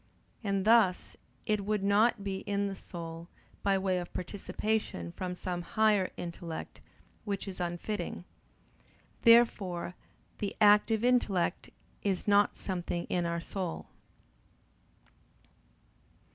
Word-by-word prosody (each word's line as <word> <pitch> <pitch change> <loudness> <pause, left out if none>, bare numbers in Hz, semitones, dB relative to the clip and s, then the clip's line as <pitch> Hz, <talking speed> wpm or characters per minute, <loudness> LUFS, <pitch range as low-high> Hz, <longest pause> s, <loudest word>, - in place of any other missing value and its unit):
And 195 -2 0
thus 220 -5 +4 0.3
it 210 -1 0
would 210 0 -1
not 205 +2 +3
be 195 -1 -2
in 200 0 0
the 195 - -4
soul 165 -2 -8 0.3
by 195 -1 +2
way 190 -1 0
of 175 - -7
participation 195 - -2
from 180 - -4
some 180 -1 -3
higher 210 0 +2
intellect: 170 -1 -6 0.4
which 200 -1 -3
is 190 -2 -7
unfitting. 175 +4 -3 1.0
Therefore 210 -7 +4 0.5
the 205 - -3
active 210 +1 +5
intellect 210 -8 +1 0.3
is 195 -1 -1
not 205 0 +4
something 175 -2 -3
in 175 -1 +1
our 170 0 -2
soul. 180 -1 -5
195 Hz, 110 wpm, -31 LUFS, 175-210 Hz, 1.0 s, active